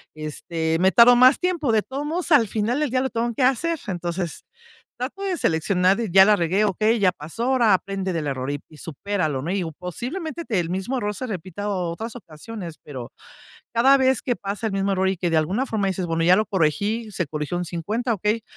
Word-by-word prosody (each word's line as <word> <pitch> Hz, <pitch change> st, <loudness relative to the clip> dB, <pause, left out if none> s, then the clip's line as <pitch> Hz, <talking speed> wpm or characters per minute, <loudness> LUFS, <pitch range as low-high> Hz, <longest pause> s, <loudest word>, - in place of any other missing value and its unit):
este, 160 Hz, +1 st, -2 dB
me 190 Hz, +1 st, +4 dB
tardo 245 Hz, +1 st, +8 dB
más 255 Hz, +2 st, +6 dB
tiempo, 345 Hz, -8 st, 0 dB
de 215 Hz, -, +4 dB
todos 275 Hz, +5 st, -5 dB
modos, 335 Hz, +2 st, -2 dB
al 250 Hz, -7 st, +6 dB
final 225 Hz, +6 st, -1 dB
del 300 Hz, -3 st, 0 dB
día 255 Hz, 0 st, +1 dB
lo 265 Hz, -, -1 dB
tengo 235 Hz, +1 st, -2 dB
que 255 Hz, -, -1 dB
hacer". 310 Hz, +5 st, +1 dB
Entonces, 175 Hz, -2 st, -4 dB, 0.6 s
trato 280 Hz, +11 st, -5 dB
de 375 Hz, -3 st, -1 dB
seleccionar, 180 Hz, +4 st, +2 dB
ya 190 Hz, +2 st, +8 dB
la 210 Hz, 0 st, +5 dB
regué, 190 Hz, +4 st, +1 dB
¿okey?, 215 Hz, +4 st, +1 dB
ya 185 Hz, -2 st, +4 dB
pasó, 165 Hz, +8 st, -7 dB
ahora 245 Hz, -6 st, +4 dB
aprende 190 Hz, 0 st, -3 dB
del 160 Hz, -2 st, -2 dB
error 130 Hz, 0 st, -3 dB
y 145 Hz, +2 st, -8 dB
supéralo, 160 Hz, -2 st, -3 dB
¿no?, 170 Hz, -, -3 dB
y 195 Hz, -2 st, 0 dB, 0.2 s
posiblemente, 305 Hz, -, -5 dB
el 175 Hz, -6 st, 0 dB
mismo 195 Hz, +8 st, -2 dB
error 210 Hz, -3 st, -2 dB
se 255 Hz, -, -4 dB
repita 195 Hz, +1 st, -5 dB
otras 185 Hz, +5 st, -3 dB
ocasiones, 175 Hz, -2 st, -9 dB
pero, 130 Hz, -5 st, -8 dB, 0.6 s
cada 265 Hz, +4 st, +6 dB
vez 265 Hz, 0 st, +2 dB
que 245 Hz, -3 st, -1 dB
pasa 200 Hz, +3 st, -4 dB
el 215 Hz, -, -2 dB
mismo 195 Hz, 0 st, 0 dB
error 190 Hz, 0 st, +1 dB
y 190 Hz, -, 0 dB
que 175 Hz, -2 st, -1 dB
de 160 Hz, -, +3 dB
alguna 190 Hz, +12 st, 0 dB
forma 215 Hz, -4 st, -1 dB
dices: 185 Hz, -1 st, -2 dB
"Bueno, 165 Hz, 0 st, -1 dB
ya 180 Hz, +2 st, +6 dB
lo 215 Hz, -, +2 dB
corregí, 205 Hz, +6 st, 0 dB
se 175 Hz, -4 st, -2 dB
corrigió 150 Hz, +3 st, -4 dB
un 180 Hz, -, -2 dB
50", 215 Hz, +9 st, -2 dB
okey, 210 Hz, +3 st, -1 dB
200 Hz, 210 wpm, -23 LUFS, 170-240 Hz, 0.6 s, tardo